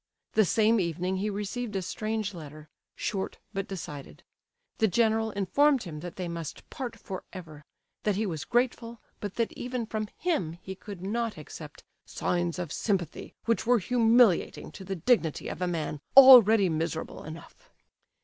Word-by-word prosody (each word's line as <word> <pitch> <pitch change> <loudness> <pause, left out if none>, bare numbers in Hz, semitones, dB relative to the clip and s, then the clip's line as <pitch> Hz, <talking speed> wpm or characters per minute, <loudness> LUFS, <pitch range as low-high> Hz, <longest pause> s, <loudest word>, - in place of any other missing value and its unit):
The 215 - +4
same 220 +4 +3
evening 180 +1 -1
he 205 +3 -1
received 210 +2 -4
a 190 - -1
strange 215 +2 -3
letter, 155 -2 -10 0.3
short 195 -2 -3 0.2
but 195 -1 -3
decided. 150 -7 -8 0.6
The 220 - +4
general 220 +2 +2
informed 260 +7 +2
him 155 -4 -7
that 175 +2 -8
they 180 -2 -4
must 170 -2 -6
part 255 -4 -5
for 190 -2 -7
ever; 155 -6 -10 0.4
that 210 -2 0
he 215 +3 0
was 160 -6 -3
grateful, 235 -1 -1 0.2
but 205 -2 -5
that 230 -1 0
even 245 -1 -4
from 215 -1 -3
him 305 - -1
he 190 +1 -7
could 190 -1 -10
not 230 +1 -2
accept 150 - -10 0.2
"signs 175 -1 -2
of 175 -4 -4
sympathy 185 -7 -2
which 230 0 0
were 245 0 +5
humiliating 230 -1 +3
to 195 - -10
the 195 +1 -4
dignity 170 - +1
of - - -6
a 180 - +1
man 155 -4 -3 0.2
already 225 -7 +10
miserable 160 0 -3
enough." 165 - -11
195 Hz, 160 wpm, -28 LUFS, 170-230 Hz, 0.6 s, already